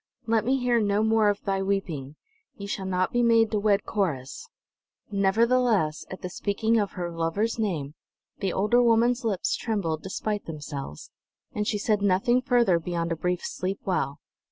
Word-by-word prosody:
"Let 225 Hz, -1 st, +1 dB
me 265 Hz, +2 st, +2 dB
hear 245 Hz, -2 st, +2 dB
no 205 Hz, 0 st, +1 dB
more 220 Hz, -1 st, +3 dB
of 205 Hz, 0 st, -2 dB
thy 195 Hz, -1 st, 0 dB
weeping! 170 Hz, -8 st, -2 dB, 0.4 s
Ye 200 Hz, -, -7 dB
shall 195 Hz, -1 st, -4 dB
not 185 Hz, 0 st, 0 dB
be 240 Hz, -, +2 dB
made 230 Hz, -2 st, +4 dB
to 215 Hz, -, +1 dB
wed 205 Hz, -1 st, +2 dB
Corrus!" 155 Hz, -, -2 dB, 0.6 s
Nevertheless, 205 Hz, -4 st, +2 dB
at 190 Hz, -, -9 dB
the 180 Hz, -, -3 dB
speaking 220 Hz, +4 st, 0 dB
of 205 Hz, -2 st, -1 dB
her 175 Hz, -1 st, -4 dB
lover's 170 Hz, +8 st, -1 dB
name, 160 Hz, -10 st, -2 dB, 0.5 s
the 195 Hz, -3 st, -1 dB
older 210 Hz, +7 st, +3 dB
woman's 240 Hz, +2 st, +3 dB
lips 205 Hz, -5 st, 0 dB
trembled 180 Hz, -9 st, -2 dB
despite 205 Hz, +2 st, -3 dB
themselves; 145 Hz, -, -7 dB, 0.4 s
and 210 Hz, 0 st, -2 dB
she 210 Hz, -, 0 dB
said 210 Hz, 0 st, 0 dB
nothing 205 Hz, +6 st, +3 dB
further 240 Hz, -9 st, +3 dB
beyond 170 Hz, 0 st, -3 dB
a -, -, +1 dB
brief 180 Hz, +2 st, -2 dB
"Sleep 190 Hz, +2 st, -3 dB
well." 140 Hz, -7 st, -1 dB
200 Hz, 170 wpm, -26 LUFS, 175-225 Hz, 0.6 s, made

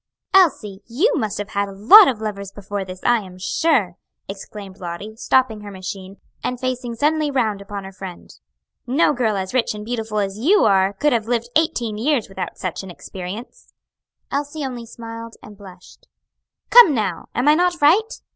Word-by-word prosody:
"Elsie, 250 Hz, -, +3 dB
you 325 Hz, -, +1 dB
must 215 Hz, -2 st, -2 dB
have 205 Hz, 0 st, -5 dB
had 200 Hz, -1 st, -1 dB
lots 230 Hz, -, +8 dB
of 240 Hz, -5 st, -3 dB
lovers 200 Hz, -3 st, -5 dB
before 200 Hz, 0 st, -5 dB
this, 185 Hz, -1 st, -9 dB
I 240 Hz, -1 st, +3 dB
am 185 Hz, -3 st, -11 dB
sure!" 205 Hz, -, 0 dB, 0.3 s
exclaimed 195 Hz, 0 st, -9 dB
Lottie, 180 Hz, +5 st, -7 dB
stopping 235 Hz, -2 st, +1 dB
her 205 Hz, -, -9 dB
machine, 195 Hz, 0 st, -8 dB, 0.3 s
and 250 Hz, -1 st, -3 dB
facing 250 Hz, -2 st, -3 dB
suddenly 300 Hz, +4 st, +1 dB
round 220 Hz, -7 st, 0 dB
upon 200 Hz, 0 st, -7 dB
her 190 Hz, -, -9 dB
friend. 190 Hz, -2 st, -10 dB, 0.5 s
"No 280 Hz, +5 st, +3 dB
girl 225 Hz, -5 st, 0 dB
as 190 Hz, +2 st, -4 dB
rich 245 Hz, -4 st, 0 dB
and 210 Hz, 0 st, -8 dB
beautiful 225 Hz, -2 st, -3 dB
as 200 Hz, 0 st, -2 dB
you 370 Hz, -, +4 dB
are 195 Hz, -1 st, +3 dB
could 290 Hz, +8 st, +1 dB
have 225 Hz, -2 st, -1 dB
lived 235 Hz, 0 st, -1 dB
eighteen 240 Hz, -9 st, 0 dB
years 265 Hz, -1 st, +1 dB
without 190 Hz, -3 st, -6 dB
such 185 Hz, -3 st, -4 dB
an 190 Hz, -, -10 dB
experience." 190 Hz, +7 st, -9 dB, 0.6 s
Elsie 290 Hz, +1 st, -3 dB
only 245 Hz, -3 st, -6 dB
smiled 230 Hz, 0 st, -9 dB
and 210 Hz, -, -12 dB
blushed. 190 Hz, -3 st, -15 dB, 0.6 s
"Come 435 Hz, -, +8 dB
now, 195 Hz, -7 st, -2 dB
am 250 Hz, +4 st, 0 dB
I 300 Hz, -, +7 dB
not 350 Hz, +1 st, +1 dB
right?" 390 Hz, +11 st, +3 dB
220 Hz, 175 wpm, -21 LUFS, 195-260 Hz, 0.6 s, lots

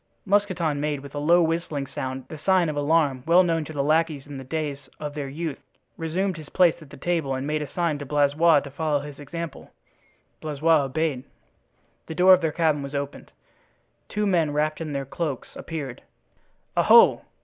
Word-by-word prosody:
Mousqueton 185 Hz, -7 st, +1 dB
made, 150 Hz, -2 st, -1 dB
with 140 Hz, 0 st, -11 dB
a 145 Hz, -, -3 dB
low 170 Hz, +4 st, +4 dB
whistling 160 Hz, -3 st, -1 dB
sound, 130 Hz, -1 st, -5 dB
the 155 Hz, -, -9 dB
sign 185 Hz, 0 st, +3 dB
of 150 Hz, -, -3 dB
alarm 145 Hz, -3 st, +2 dB
well 175 Hz, +2 st, +6 dB
known 165 Hz, -2 st, 0 dB
to -, -, -8 dB
the 145 Hz, -3 st, -1 dB
lackeys 155 Hz, -1 st, +1 dB
in 145 Hz, -2 st, -8 dB
the -, -, -7 dB
days 140 Hz, -1 st, -4 dB
of 150 Hz, -1 st, -5 dB
their 145 Hz, -2 st, -4 dB
youth, 155 Hz, +1 st, -4 dB, 0.4 s
resumed 175 Hz, +3 st, -2 dB
his 155 Hz, -3 st, -10 dB
place 180 Hz, -3 st, +4 dB
at 155 Hz, -, -13 dB
the -, -, -12 dB
table 155 Hz, -3 st, -1 dB
and 130 Hz, +1 st, -4 dB
made 150 Hz, +1 st, -1 dB
a 150 Hz, -, -5 dB
sign 165 Hz, -3 st, -1 dB
to 145 Hz, -, -6 dB
Blaisois 145 Hz, +2 st, +4 dB
to 140 Hz, -, -9 dB
follow 150 Hz, 0 st, 0 dB
his 145 Hz, -1 st, -9 dB
example. 165 Hz, +3 st, -7 dB, 0.7 s
Blaisois 155 Hz, 0 st, +2 dB
obeyed. 140 Hz, -1 st, -1 dB, 0.8 s
The 160 Hz, -, -6 dB
door 185 Hz, +2 st, +7 dB
of 185 Hz, -, +4 dB
their 160 Hz, -2 st, 0 dB
cabin 155 Hz, -2 st, +1 dB
was 140 Hz, +1 st, -6 dB
opened. 140 Hz, 0 st, -5 dB, 0.8 s
Two 210 Hz, 0 st, -1 dB
men, 170 Hz, -6 st, +2 dB
wrapped 155 Hz, +2 st, -1 dB
in 155 Hz, -2 st, -4 dB
their 140 Hz, -1 st, -3 dB
cloaks, 140 Hz, -1 st, -4 dB
appeared. 145 Hz, -7 st, -6 dB, 0.7 s
"Oho!" -, -, +6 dB
155 Hz, 190 wpm, -25 LUFS, 140-165 Hz, 0.8 s, door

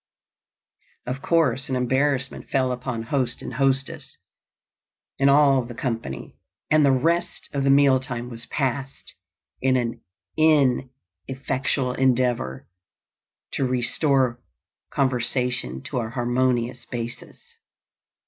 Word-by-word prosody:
Of 130 Hz, +2 st, -4 dB
course 135 Hz, -7 st, +1 dB
an 130 Hz, -, 0 dB
embarrassment 130 Hz, +1 st, 0 dB
fell 130 Hz, -2 st, +1 dB
upon 125 Hz, -2 st, -4 dB
host 125 Hz, 0 st, -1 dB
and -, -, -6 dB
hostess 135 Hz, +1 st, -1 dB, 1.0 s
and 135 Hz, +1 st, +5 dB
all 140 Hz, -2 st, +5 dB
the 120 Hz, 0 st, -9 dB
company, 115 Hz, -, -4 dB, 0.4 s
and 155 Hz, 0 st, +5 dB
the 140 Hz, -, +5 dB
rest 165 Hz, +7 st, 0 dB
of 140 Hz, -1 st, 0 dB
the 135 Hz, -, +2 dB
meal 135 Hz, -1 st, +5 dB
time 125 Hz, -2 st, -5 dB
was 115 Hz, -1 st, -8 dB
passed 135 Hz, -7 st, -3 dB, 0.5 s
in 130 Hz, 0 st, +3 dB
an 120 Hz, -1 st, -2 dB, 1.3 s
ineffectual 130 Hz, -1 st, -1 dB
endeavor 125 Hz, -, 0 dB, 0.8 s
to -, -, -1 dB
restore 130 Hz, 0 st, +1 dB, 0.5 s
conversation 125 Hz, -, 0 dB
to 125 Hz, -, -3 dB
a 115 Hz, -2 st, -3 dB
harmonious 120 Hz, 0 st, 0 dB
basis. 120 Hz, -1 st, -6 dB
130 Hz, 110 wpm, -24 LUFS, 120-135 Hz, 1.3 s, and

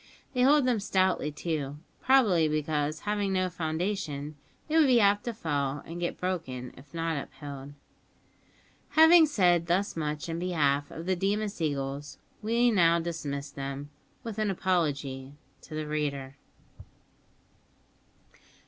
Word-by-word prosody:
They 250 Hz, -, +1 dB
hold 280 Hz, +1 st, +5 dB
them 245 Hz, -4 st, +2 dB
stoutly, 185 Hz, -5 st, +1 dB
too, 150 Hz, -2 st, -3 dB, 0.2 s
probably 210 Hz, -12 st, +4 dB
because, 155 Hz, 0 st, -1 dB
having 205 Hz, -1 st, -1 dB
no 185 Hz, -1 st, 0 dB
foundation, 160 Hz, -3 st, -3 dB, 0.3 s
they 310 Hz, -, -1 dB
would 320 Hz, -3 st, +6 dB
be 250 Hz, -2 st, +5 dB
apt 205 Hz, -1 st, +3 dB
to 240 Hz, -, -2 dB
fall 145 Hz, -7 st, -2 dB
and 170 Hz, +1 st, -7 dB
get 175 Hz, -, -3 dB
broken 145 Hz, -9 st, -3 dB
if 130 Hz, +3 st, -16 dB
not 165 Hz, -3 st, -2 dB
upheld. 140 Hz, 0 st, -9 dB, 1.2 s
Having 320 Hz, 0 st, +8 dB
said 175 Hz, -, +3 dB
thus 185 Hz, +4 st, +1 dB
much 150 Hz, -2 st, -3 dB
in 165 Hz, 0 st, -3 dB
behalf 145 Hz, -5 st, +1 dB
of 165 Hz, -, -8 dB
the 185 Hz, 0 st, +1 dB
Deemas 200 Hz, +1 st, -1 dB
eagles, 140 Hz, -1 st, -3 dB, 0.2 s
we 235 Hz, +3 st, +3 dB
now 170 Hz, -5 st, +4 dB
dismiss 145 Hz, -4 st, -4 dB
them, 140 Hz, +1 st, -6 dB, 0.3 s
with 225 Hz, -3 st, -5 dB
an 215 Hz, -1 st, +1 dB
apology 145 Hz, -8 st, -1 dB, 0.3 s
to 155 Hz, -, -9 dB
the 155 Hz, 0 st, -3 dB
reader. 140 Hz, -3 st, -3 dB
165 Hz, 135 wpm, -29 LUFS, 145-200 Hz, 1.2 s, Having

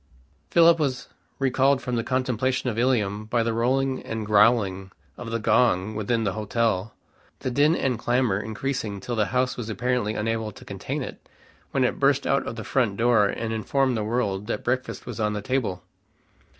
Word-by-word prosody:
Philip 170 Hz, -1 st, +6 dB
was 135 Hz, -4 st, -2 dB, 0.3 s
recalled 135 Hz, 0 st, +2 dB
from 125 Hz, -2 st, -3 dB
the 115 Hz, -, 0 dB
contemplation 130 Hz, 0 st, 0 dB
of 110 Hz, -, -4 dB
Ilium 110 Hz, -5 st, +1 dB
by 115 Hz, +1 st, +1 dB
the 115 Hz, 0 st, -1 dB
rolling 130 Hz, +3 st, +1 dB
and 110 Hz, -1 st, -4 dB
growling 105 Hz, -3 st, +3 dB, 0.3 s
of 120 Hz, -, -7 dB
the 115 Hz, -, -1 dB
gong 110 Hz, -3 st, +2 dB
within 110 Hz, +2 st, -1 dB
the 100 Hz, -3 st, 0 dB
hotel, 110 Hz, -1 st, -1 dB, 0.5 s
the 130 Hz, -, -2 dB
din 145 Hz, +6 st, +3 dB
and 125 Hz, -7 st, -1 dB
clamor 120 Hz, -5 st, +1 dB
increasing 110 Hz, -1 st, -3 dB
till 120 Hz, +5 st, -4 dB
the 105 Hz, -2 st, +1 dB
house 125 Hz, +1 st, 0 dB
was 115 Hz, -2 st, -5 dB
apparently 115 Hz, 0 st, -1 dB
unable 110 Hz, 0 st, -2 dB
to -, -, -14 dB
contain -, -, -4 dB
it; -, -, -10 dB, 0.4 s
when 135 Hz, -, +1 dB
it 125 Hz, -, 0 dB
burst 140 Hz, 0 st, +3 dB
out 140 Hz, -, +1 dB
of -, -, -4 dB
the 110 Hz, -, -6 dB
front 115 Hz, -7 st, 0 dB
door 115 Hz, -3 st, +4 dB
and 115 Hz, +2 st, -3 dB
informed 130 Hz, +3 st, +1 dB
the 110 Hz, -, -1 dB
world 105 Hz, -3 st, -1 dB
that -, -, -3 dB
breakfast 130 Hz, +1 st, -2 dB
was 120 Hz, -2 st, -7 dB
on 105 Hz, -1 st, 0 dB
the 105 Hz, -, -3 dB
table. 120 Hz, -7 st, -1 dB
115 Hz, 185 wpm, -25 LUFS, 105-130 Hz, 0.5 s, Philip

